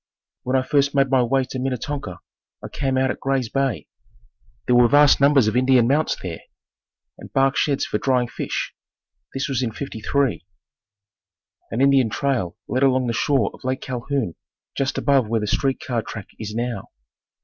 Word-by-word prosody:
When 130 +1 -2
I 130 - +3
first 140 +1 +1
made 135 -1 +2
my 130 -1 +4
way 130 +2 +1
to 130 0 -6
Minnetonka, 130 -5 -4 0.4
I - - -5
came 135 -2 -1
out 130 0 +2
at - - -7
Gray's 135 -4 -1
Bay. 135 -4 -1 0.8
There 125 - +3
were 120 0 +6
vast 145 +1 +5
numbers 140 -4 +5
of 110 - 0
Indian 125 -2 +4
mounds 150 +4 +1
there 85 -3 -5 0.8
and - - -11
bark 135 +1 +3
sheds 140 -2 +1
for 105 - -2
drying 125 0 +1
fish. - - -4 0.6
This 135 - -1
was 130 -2 -1
in 120 -3 -1
'53. 135 0 -2 1.3
An 115 - -2
Indian 135 -4 +4
trail 120 -8 -1
led 130 - -1
along 130 -2 +3
the 120 - -1
shore 130 -3 +1
of - - -16
Lake 130 0 -2
Calhoun 125 - -3 0.4
just 135 0 -1
above 135 -5 +2
where 115 0 +1
the - - -1
street 135 +5 0
car 120 -3 -2
track 110 -2 -8
is 105 -1 -6
now. 120 -3 -3
130 Hz, 175 wpm, -22 LUFS, 120-135 Hz, 1.3 s, were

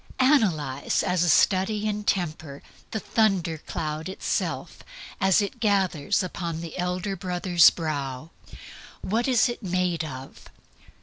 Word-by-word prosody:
Analyze, 175 - +2
as 180 -1 +1
a 175 - +2
study 205 +5 +3
in 210 0 -2
Temper, 155 -7 -2 0.3
the 220 - -3
thunder 190 -8 +1
cloud 155 +1 -4
itself 190 - -3 0.4
as 190 +2 +4
it 240 +5 -6
gathers 195 -6 +1
upon 170 -2 -4
the 165 -2 -7
Elder 180 +2 -2
Brother's 180 -2 +4
brow. 145 -2 -4 0.7
What 225 +6 -1
is 255 -2 +4
it 240 0 -5
made 180 -4 -1
of? 135 -3 -9
180 Hz, 125 wpm, -25 LUFS, 160-200 Hz, 0.7 s, as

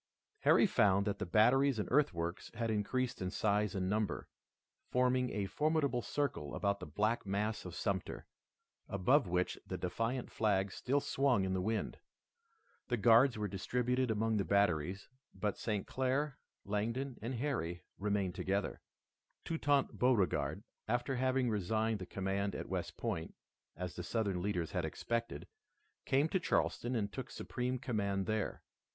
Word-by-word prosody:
Harry - - +5
found 100 -1 +3
that 100 - -1
the 105 - -3
batteries 125 +7 +4
and 105 - -1
earthworks 85 - +1
had 115 0 -1
increased 120 +4 -1
in 90 - -1
size 105 0 +1
and 95 -1 0
number, 105 +2 -1 0.6
forming 125 0 +2
a 100 -2 -2
formidable 145 - +1
circle 115 - -2
about 100 -1 0
the - - -7
black 105 +9 0
mass 105 +2 -1
of 90 -1 -6
Sumter, 95 -2 -2 0.6
above 105 +7 +3
which 90 +1 0
the - - -3
defiant 120 +2 -2
flag 100 -3 +1
still 140 +7 0
swung 130 -10 +2
in 95 - -1
the 95 - 0
wind. 110 +3 -2 0.9
The 120 - 0
guards 115 +3 +6
were 105 -1 -1
distributed 125 +6 0
among 110 0 +1
the 100 - +2
batteries, 95 -2 +1 0.3
but 100 +1 -1
St. 105 -3 -1
Clair, 135 +2 -1 0.3
Langdon, 115 +6 -2
and 120 +4 -3
Harry 115 - -2 0.2
remained 100 -2 0
together. 95 +2 -1 0.6
Toutant 145 -4 +1
Beauregard, 120 -8 +2 0.2
after 120 +3 0
having 130 0 +2
resigned 110 +1 0
the 90 - -6
command 95 +1 -1
at - - -5
West - - -3
Point, 80 - -3 0.4
as 90 0 -5
the 90 - -5
Southern 100 -2 -1
leaders 90 -4 -1
had - - -1
expected, 115 0 -3 0.6
came 140 +4 +3
to 190 - +1
Charleston 125 -7 0
and 100 -3 -1
took 130 - -5
supreme 125 +1 -3
command 100 -6 -1
there. 110 0 -2
110 Hz, 150 wpm, -35 LUFS, 95-125 Hz, 0.9 s, guards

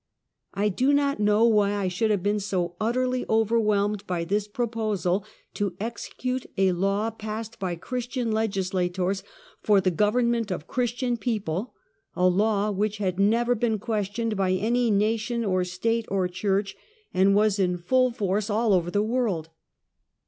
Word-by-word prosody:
I 205 +1 +1
do 260 +8 +2
not 280 -2 +1
know 210 +2 +4
wh}' 215 -2 +4
I 200 -2 -1
should 185 +5 0
have 205 -4 +1
been 205 +1 +1
so 185 -3 -2
utterly 250 +3 0
overwhelmed 210 -2 +1
by 175 -2 -1
this 200 +4 -1
proposal 210 -5 -1 0.3
to 200 -4 -2
execute 250 +3 -4
a 190 -1 +4
law 195 +5 0
passed 220 +1 -6
by 185 -3 -2
Christian 245 +5 -3
legislators 190 -3 -1 0.4
for 205 -2 +4
the 185 -1 +1
government 230 +4 +1
of 180 -4 -4
Chris 245 -2 -1
tian 245 -1 -1
people 215 -3 -3 0.2
— 140 - -46
a 180 - +3
law 205 +2 +2
which 210 +1 -1
had 190 -2 -2
never 230 +4 +3
been 225 -1 0
questioned 215 +1 -2
by 190 -2 +1
any 235 +5 +1
nation, 220 +3 0
or 185 -2 +1
state, 225 +6 -1
or 190 -2 +1
church, 195 +2 -1 0.4
and 195 +2 +4
was 210 -1 +3
in 180 -2 +1
full 255 +9 +2
force 205 -3 -1
all 215 0 +2
over 175 -2 +2
the 205 +3 +1
world. 215 -9 -1
210 Hz, 160 wpm, -26 LUFS, 190-230 Hz, 0.4 s, know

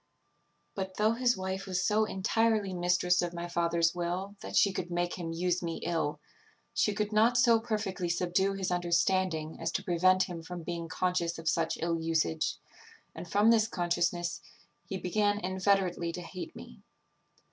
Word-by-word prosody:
"But, 190 -1 -5
though 215 +1 +3
his 240 -1 +2
wife 190 +1 -4
was 185 -1 -1
so 215 +1 +3
entirely 215 0 +1
mistress 180 0 +2
of 175 0 -3
my 170 0 -4
father's 170 -1 +1
will 180 +3 -3
that - - -6
she 200 - +4
could 180 -2 -4
make 175 0 -1
him 170 -2 -5
use 175 +1 0
me 165 -2 -3
ill, 160 -4 -1 0.5
she 210 - +2
could 210 0 -2
not 230 +3 +4
so 235 -2 +5
perfectly 210 -6 -2
subdue 180 +3 +1
his 190 -2 -2
understanding 175 -2 0
as - - -1
to - - -1
prevent 185 +2 +3
him 175 -3 -6
from 175 +1 -7
being 170 0 -4
conscious 180 -1 -1
of 165 0 -8
such 165 0 +1
ill 165 0 -1
usage; 160 - 0 0.6
and 175 - -8
from 205 +5 +4
this 220 -1 +4
consciousness, 175 -2 -1 0.5
he 190 - -3
began 205 +3 +1
inveterately 185 -2 0
to 180 - -5
hate 180 +1 -8
me. - - -12
180 Hz, 170 wpm, -30 LUFS, 170-195 Hz, 0.6 s, so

